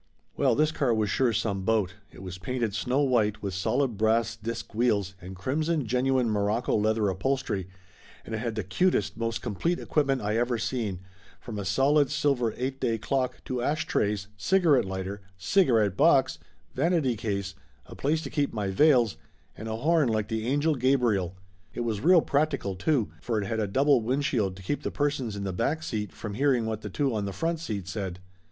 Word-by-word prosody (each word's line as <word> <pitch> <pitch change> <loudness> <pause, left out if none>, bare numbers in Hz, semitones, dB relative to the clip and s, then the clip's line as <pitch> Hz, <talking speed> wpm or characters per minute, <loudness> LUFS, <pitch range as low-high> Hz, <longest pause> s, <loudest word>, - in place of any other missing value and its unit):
Well, 130 -5 +3
this 155 +3 +2
car 130 -6 +1
was 110 -2 0
sure 130 -3 +2
some 100 -2 -1
boat. 100 -2 +1 0.2
It - - -12
was 95 -1 -7
painted 120 -1 -2
snow 125 +6 0
white 110 -6 +1
with 100 -2 -3
solid 120 +5 0
brass 115 +2 +2
disk 115 0 -6
wheels 105 -4 +1
and 95 +2 -8
crimson 150 - -1
genuine 125 +2 +1
morocco 105 +2 0
leather 110 -1 +2
upholstery, 100 -1 -1 0.6
and - - -7
it 110 - -1
had 115 -1 -3
the 110 - -2
cutest, 110 - +1
most 115 -1 -3
complete 125 - -1
equipment 140 -3 0
I 105 +2 0
ever 120 0 +1
seen, 110 -5 -2 0.4
from 110 -3 -6
a 100 - -4
solid 140 +4 +3
silver 140 -6 +1
eight 130 +2 -3
day 115 -1 0
clock 130 +3 -2
to 125 -1 -2
ash 150 +5 0
trays, 100 -2 0
cigarette 160 - +3
lighter, 95 +1 -5 0.2
cigarette 110 - +3
box, 135 - +4 0.3
vanity 145 -3 +1
case, 100 -3 -3 0.3
a - - -11
place 155 +3 0
to - - -6
keep 145 -2 0
my 105 -3 -2
veils, 120 - +4 0.4
and 110 - -7
a 110 - -2
horn 150 +2 +2
like 110 -2 -1
the 110 0 -2
Angel 145 +4 +2
Gabriel. 120 - +1 0.4
It - - -2
was 110 -4 -2
real 175 +3 +6
practical, 140 -11 0
too, 115 - 0
for 115 -3 -1
it 100 - -2
had 110 +3 -2
a 105 - 0
double 135 +5 +3
windshield 120 -5 0
to 95 - -12
keep 145 +10 -2
the - - -2
persons 140 -7 -1
in 100 - -4
the 95 -1 -3
back 155 - -1
seat 105 - -3
from 105 -2 -7
hearing 130 -1 +2
what 110 -1 -3
the 105 - -6
two 135 +6 0
on 105 -2 -1
the 100 - -3
front 165 - -1
seat 105 - -4
said. 95 -3 -4
115 Hz, 195 wpm, -27 LUFS, 105-140 Hz, 0.6 s, real